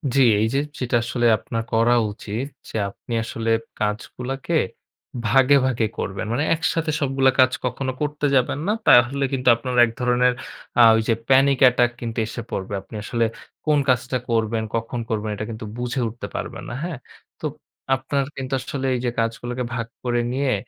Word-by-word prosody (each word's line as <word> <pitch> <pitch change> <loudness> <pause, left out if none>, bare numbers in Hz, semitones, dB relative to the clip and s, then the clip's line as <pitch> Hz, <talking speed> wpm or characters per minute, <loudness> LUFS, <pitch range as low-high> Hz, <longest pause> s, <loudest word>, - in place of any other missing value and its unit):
জ্বি, 135 - +5 0.2
এই 110 - +3
যে 135 - +2 0.2
যেটা 125 -1 0
আসলে 120 +1 -1
আপনার 115 +2 -4
করা 115 +2 +4 0.2
উচিত, 110 +5 -5 0.2
যে, - - -10
আপনি 110 +4 -9
আসলে 115 0 -3 0.3
কাজগুলোকে 125 +8 -3 0.7
ভাগে, 135 +3 +5
ভাগে 120 -4 +1
করবেন। 95 +2 -3
মানে, 140 +5 +1
একসাথে 165 -1 0
সবগুলো 135 -1 +3
কাজ 130 0 +6
কখনো 130 +2 -2
করতে 150 0 -1
যাবেন 130 +2 +2
না। - - +3 0.2
তাহলে 125 +3 +6
কিন্তু 125 -1 -2
আপনার 125 +2 -4
এক 115 - -5
ধরনের 125 0 +3 0.5
আ - - +9
ওই 110 - +2
যে, 115 - +4
panic 135 +1 +5
attack 120 0 +2
কিন্তু 115 -1 -5
এসে 115 +1 -5
পড়বে। 95 +1 -4
আপনি 105 - -13
আসলে 115 +2 0 0.4
কোন 150 -1 +3
কাজটা 130 +1 +1
করবেন, 115 -1 +1
কখন 115 +2 -2
করবেন 110 -1 -1
এটা 105 - -4
কিন্তু 110 0 -6
বুঝে 125 +1 -2
উঠতে 115 +2 -6
পারবেন - - -5
না। - - -5
হ্যাঁ, 170 -4 -4 0.4
তো - - -6 0.5
আপনার 135 +1 -1
কিন্তু 135 0 -4
আসলে 135 +1 -3 0.2
যে, - - 0
এই - - -7
কাজগুলোকে 120 +2 -3
ভাগ 115 -1 -3 0.2
করে 120 -1 +1
নিয়ে, 135 0 +1
125 Hz, 175 wpm, -22 LUFS, 115-135 Hz, 0.7 s, আ